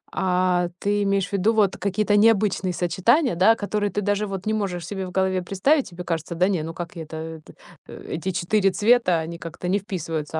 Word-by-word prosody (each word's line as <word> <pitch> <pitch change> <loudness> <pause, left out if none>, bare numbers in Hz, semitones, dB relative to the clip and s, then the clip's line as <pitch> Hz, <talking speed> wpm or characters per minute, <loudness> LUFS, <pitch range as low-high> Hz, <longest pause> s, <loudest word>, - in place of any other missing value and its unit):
А, 180 -1 +1
ты 205 0 0
имеешь 195 -1 0
в - - -15
виду 200 +4 +2
вот 205 -3 +2
какие-то 205 +1 0
необычные 205 -4 +3
сочетания, 190 - +2
да, 200 +6 +5
которые 205 -1 -2
ты 205 - -2
даже 205 +1 0
вот 195 -1 -6
не 215 - 0
можешь 180 -5 -2
себе 190 -1 -5
в - - -9
голове 190 -1 0
представить? 255 - +1
Тебе 180 0 -8
кажется: 165 0 -3
да 180 +3 +3
не, 185 -6 0
ну 165 +1 -5
как 175 0 -7
я 165 - -6
это 160 - -10
это 160 -1 -8 0.3
э, - - -11
эти 175 +4 -3
4 195 +3 +1
цвета, 210 -5 +3
они 165 +1 -5
как-то 170 +2 -7
не 200 +3 +2
вписываются. 165 -5 -4
190 Hz, 215 wpm, -23 LUFS, 175-205 Hz, 0.3 s, да